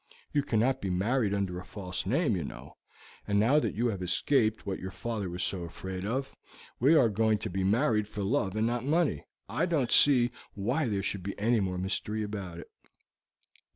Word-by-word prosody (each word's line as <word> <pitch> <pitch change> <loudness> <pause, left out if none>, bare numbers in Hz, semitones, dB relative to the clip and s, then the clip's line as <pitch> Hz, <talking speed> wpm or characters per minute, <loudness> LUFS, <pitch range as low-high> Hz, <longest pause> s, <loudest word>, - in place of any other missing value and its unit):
You 145 - +3
cannot 130 0 +1
be 95 - -2
married 105 +5 +1
under 95 -3 -1
a - - -8
false 95 -2 -5
name, 135 - +2
you 85 - -2
know, - - -9 0.5
and 100 0 +2
now 130 +8 +4
that - - -2
you 115 +4 0
have 100 -4 -4
escaped 110 +5 +1
what 95 -2 -3
your 95 - -5
father 100 +1 -4
was 90 +1 -3
so 95 - -1
afraid 95 +3 -6
of, 135 +4 -3 0.4
and 145 +7 +5
are 130 - +6
going 110 0 +2
to 95 - -5
be 95 +1 -1
married 105 +1 +2
for 105 -1 -5
love 100 -3 0
and 110 +1 +1
not 120 +1 0
for 130 - -7
money, 155 - +1 0.2
I - - 0
don't 145 -9 0
see 125 -4 +6 0.2
why 120 +9 0
there 100 -3 -1
should 100 0 -2
be 100 +2 -5
any 115 +3 +2
more 95 -2 -1
mystery 100 +3 -1
about 100 -5 -5
it." 85 - -10
105 Hz, 205 wpm, -29 LUFS, 95-120 Hz, 0.5 s, are